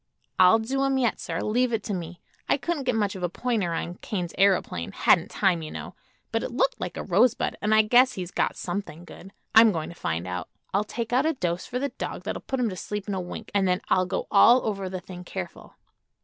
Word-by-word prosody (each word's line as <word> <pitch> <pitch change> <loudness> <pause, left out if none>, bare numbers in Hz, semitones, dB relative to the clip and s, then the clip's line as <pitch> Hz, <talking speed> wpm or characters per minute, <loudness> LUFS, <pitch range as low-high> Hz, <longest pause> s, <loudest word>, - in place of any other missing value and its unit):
"I'll 185 +4 +7
do 265 +5 -1
him 270 -1 +1
yet, 245 -3 +1
sir. - - -3
Leave 245 +3 +1
it 220 -2 -1
to 210 - -3
me. 175 -1 -6 0.3
I - - +4
couldn't 295 -1 -3
get 250 -2 +1
much 205 -3 0
of 190 - -7
a 175 - 0
pointer 215 -3 -1
on 170 +2 -4
Kane's 180 -5 -4
aëroplane; 190 - +1
hadn't - - +3
time, 180 -4 +1
you 155 - -6
know; - - -7 0.4
but - - 0
it - - -3
looked - - 0
like - - -4
a - - -3
rosebud 250 -2 +2
an' 210 - 0
I 215 0 +6
guess 250 +4 +5
he's 180 -2 -6
got - - 0
something 175 -2 -5
good. 190 +2 -12 0.2
I'm 225 0 +8
going 160 -4 -3
to 170 - -10
find 85 - -3
out. 90 -2 -5 0.2
I'll 200 +2 +2
take 230 +2 -5
out 265 +5 +3
a 320 - +2
dose 180 - -2
for 250 - -3
the 280 +2 -1
dog - - -6
that'll - - -4
put 265 - -3
him 240 -3 +1
to 185 - -6
sleep 205 +2 -5
in 205 - -2
a 190 - -2
wink, 175 - -8
and 200 -2 +2
then 180 0 +2
I'll 185 -1 +3
go - - -2
all 240 +5 +6
over 195 -3 -2
the 185 -1 -5
thing 180 -1 -9
careful." 90 - -8
200 Hz, 245 wpm, -26 LUFS, 180-240 Hz, 0.4 s, I'm